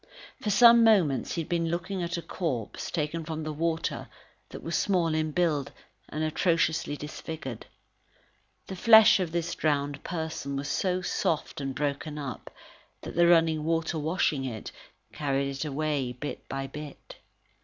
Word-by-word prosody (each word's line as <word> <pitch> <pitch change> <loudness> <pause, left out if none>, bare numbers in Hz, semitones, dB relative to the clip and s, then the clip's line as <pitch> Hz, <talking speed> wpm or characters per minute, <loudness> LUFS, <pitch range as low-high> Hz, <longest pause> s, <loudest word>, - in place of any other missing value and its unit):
For 210 - -2
some 235 +3 +7
moments, 175 - +3
he 170 - -1
had - - -14
been 170 -2 0
looking 180 +3 -3
at 170 0 -2
a 170 - -5
corpse, 135 - -3
taken 160 0 -2
from 160 0 -5
the 155 0 -4
water, 165 +1 -2 0.4
that - - -9
was 165 - -2
small 175 -5 +1
in 155 0 0
build 155 -3 0 0.4
and 155 +1 -3
atrociously 160 -2 +1
disfigured. 150 -4 -7 1.0
The 190 - -6
flesh 220 +2 +7
of 180 -4 -2
this 170 0 -2
drowned 145 -2 -1
person 160 -5 -4
was 140 +1 -3
so 185 -1 0
soft 155 -4 -1
and 135 -1 -3
broken 145 +1 -2
up 140 -6 -6 0.5
that - - -7
the 170 0 +4
running 165 -2 +4
water 165 0 0
washing 155 -3 0
it, 115 -5 -5 0.4
carried 140 -1 -1
it 135 +3 -4
away 145 -3 -1
bit 145 +4 -7
by 135 0 -3
bit. 150 +1 -10
155 Hz, 155 wpm, -28 LUFS, 145-170 Hz, 1.0 s, some